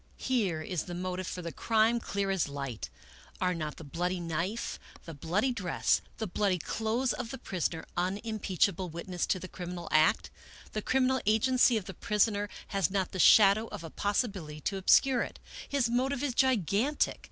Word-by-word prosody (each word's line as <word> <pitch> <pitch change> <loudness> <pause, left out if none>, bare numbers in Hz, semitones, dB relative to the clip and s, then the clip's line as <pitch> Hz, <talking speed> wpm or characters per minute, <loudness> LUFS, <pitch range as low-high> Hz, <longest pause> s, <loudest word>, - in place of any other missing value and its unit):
Here 200 -12 0
is 180 0 -3
the 175 - -6
motive 185 +1 -3
for 180 - -5
the 170 - -4
crime, 225 - +2
clear 200 -3 -2
as 190 -5 +1
Hght. 140 -5 -5 0.5
Are 180 -1 +1
not 155 -3 -4
the - - -9
bloody 175 +5 -2
knife, 170 +6 -3 0.3
the 165 - -7
bloody 180 - 0
dress, 185 -8 +1 0.2
the 220 - -2
bloody 195 -1 0
clothes 225 +8 -1
of 240 -2 -5
the 265 - -5
prisoner, 170 -6 -3
unimpeachable 190 -1 0
witnesses 170 +2 -3
to 185 - +1
the 185 - -7
criminal 175 -1 -7
act? 155 +8 +3 0.4
The 215 - -3
criminal 260 +2 +2
agency 245 +2 +4
of 205 - -4
the 190 - -7
prisoner 205 +1 +1 0.2
has 195 -3 +1
not 190 -1 -1
the 185 - -5
shadow 210 +3 +6
of 205 -6 -8
a 165 - -8
possibility 200 -7 -2
to 195 +6 -2
obscure 250 +6 +4
it. - - -5 0.3
His 275 -4 +2
motive 260 +3 0
is 275 -4 0
gigantic. 250 - +1
195 Hz, 175 wpm, -30 LUFS, 175-225 Hz, 0.5 s, shadow